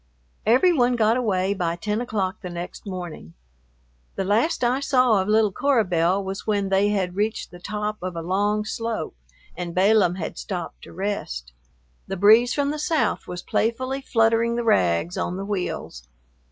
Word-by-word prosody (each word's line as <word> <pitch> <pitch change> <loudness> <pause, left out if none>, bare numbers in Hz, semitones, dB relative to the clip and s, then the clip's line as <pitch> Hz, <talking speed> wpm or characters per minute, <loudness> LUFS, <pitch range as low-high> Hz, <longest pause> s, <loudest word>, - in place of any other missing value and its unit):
Every 260 +11 +5
one 250 -4 +3
got 225 -1 +3
away 200 -6 +1
by 170 -4 -1
ten 210 +5 -2
o'clock 205 -4 -2
the 180 - -6
next 175 +4 -7
morning. 175 - -7 0.8
The 195 - -1
last 225 - +1
I 245 +2 +2
saw 255 -7 +3
of 190 - -3
little 215 -1 +3
Cora 270 +2 +2
Belle 180 +2 +1
was 195 +2 -6
when 200 -2 0
they 195 +1 +3
had 185 -3 -1
reached 210 +2 -2
the 175 - -11
top 210 +3 -4
of 185 -1 -4
a 165 - -4
long 205 +4 0
slope 230 - -3 0.4
and 175 -1 -5
Balaam 190 -1 +4
had 175 -4 -5
"stopped 180 -4 -6
to - - -12
rest." 160 - -4 0.5
The 195 - -4
breeze 220 +6 +6
from 285 0 0
the 305 - -4
south 315 +1 0
was 180 -1 -6
playfully 255 +4 -1
fluttering 230 -1 +2
the 240 - -1
rags 160 - +2
on 180 - -2
the 195 - -4
wheels. 180 - -4
205 Hz, 175 wpm, -24 LUFS, 180-230 Hz, 0.8 s, breeze